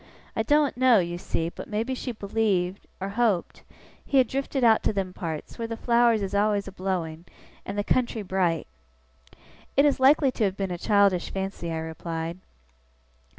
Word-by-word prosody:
I - - +1
doen't 295 -3 +2
know, 255 -2 +6
you 175 -2 -1
see, 165 -1 -2
but - - -9
maybe 225 +4 -1
she 255 0 -4
believed 200 -4 -1
or 195 +1 -3
hoped 205 -4 0 0.4
he 275 - 0
had 255 -2 +5
drifted 270 0 -2
out 225 -2 +5
to - - +1
them 195 -3 -3
parts, 160 +1 -6
where 230 - -2
the 230 0 -5
flowers 235 -2 +3
is 195 - -4
always 205 0 +1
a - - -6
blowing, 180 -4 -3 0.4
and 200 - -4
the 205 - +1
country 235 -1 0
bright.' 180 -4 0 1.1
'It 280 - +6
is 285 -2 +2
likely 275 +1 +5
to 245 - -2
have 195 -1 0
been 195 -2 -2
a 175 - -3
childish 200 -3 +3
fancy,' 190 -3 -4
I 165 - -2
replied. 160 +1 -5
200 Hz, 180 wpm, -26 LUFS, 180-235 Hz, 1.1 s, know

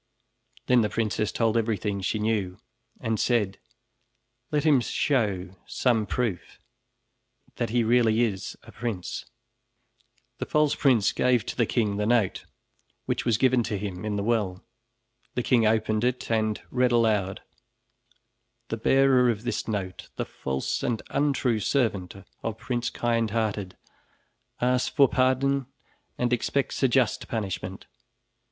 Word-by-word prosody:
Then 125 -1 +4
the 105 - +1
princess 110 -1 -1
told 115 -1 +1
everything 105 -3 0
she 100 - -1
knew 105 -4 -1 0.4
and 110 -2 -1
said: 105 -6 +1 0.9
"Let 150 -1 0
him 150 -5 +5
show 100 -9 0
some 115 -5 +1
proof 115 -8 -2 1.0
that 120 - -1
he 120 +1 +2
really 115 -1 +3
is 100 -5 -3
a - - -13
prince." 110 -8 -4 1.1
The - - -3
false 150 -1 +3
prince 125 -8 +3
gave 125 -3 +2
to - - -4
the 120 -3 +1
king 105 -4 0
the 105 0 0
note, 115 -5 +1 0.6
which - - -2
was 115 -3 +3
given 130 +1 +3
to 110 -2 -2
him 95 -2 -5
in 105 -1 -2
the 100 - -1
well. 105 -5 0 0.7
The 125 - 0
king 115 -4 +3
opened 110 0 +1
it 125 -1 -1
and 110 -1 +1
read 125 -1 +2
aloud: 105 -5 +1 1.3
"The 115 - -2
bearer 130 +1 +4
of 110 -2 -1
this 120 - -2
note, 95 -4 -4
the - - -2
false 65 0 -3
and 120 -5 -1
untrue 140 -5 +1
servant 105 -6 0 0.3
of 115 -1 -3
Prince 120 +1 -2
Kindhearted, 110 -5 -1 0.8
asks 125 +1 +2
for 140 -2 +5
pardon 130 +1 +1 0.5
and 125 0 0
expects 135 +3 -1
a 135 - +5
just 125 -3 +1
punishment. 95 -4 -4
115 Hz, 135 wpm, -26 LUFS, 105-125 Hz, 1.3 s, him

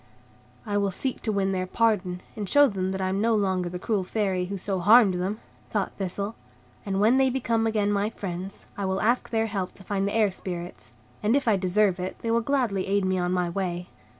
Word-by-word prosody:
"I 205 -2 -1
will 200 -1 +1
seek 255 +7 -3
to 220 - -1
win 195 -1 +1
their 185 -1 -1
pardon, 185 -4 +1
and 205 -4 -4
show 290 0 +6
them 190 -5 -2
that 190 0 -3
I 185 - 0
am 195 +2 0
no 225 0 +3
longer 190 -4 0
the 180 - -5
cruel 200 +1 -1
Fairy 190 -2 -1
who 195 +2 -4
so 190 0 -2
harmed 210 +1 +6
them," 185 +4 -2 0.3
thought 205 -3 -1
Thistle, 200 +2 -3 0.5
"and 195 -1 0
when 225 +5 +5
they 265 0 +4
become 230 -3 0
again 210 -2 +1
my 205 +1 +1
friends, 190 -2 -6
I 200 - -3
will 190 0 0
ask 240 +3 +1
their 225 -1 +1
help 200 -4 -3
to 195 - -13
find 195 +1 -1
the 200 - -2
Air 215 -3 +3
Spirits; 175 -1 -7 0.3
and 215 +4 +2
if 280 -3 0
I 220 - +5
deserve 190 0 +2
it, 185 +1 -4
they 230 - 0
will 230 0 +3
gladly 235 -7 0
aid 200 0 +1
me 185 0 +1
on 180 0 0
my 180 -1 +1
way." 180 -1 -3
200 Hz, 230 wpm, -26 LUFS, 185-220 Hz, 0.5 s, show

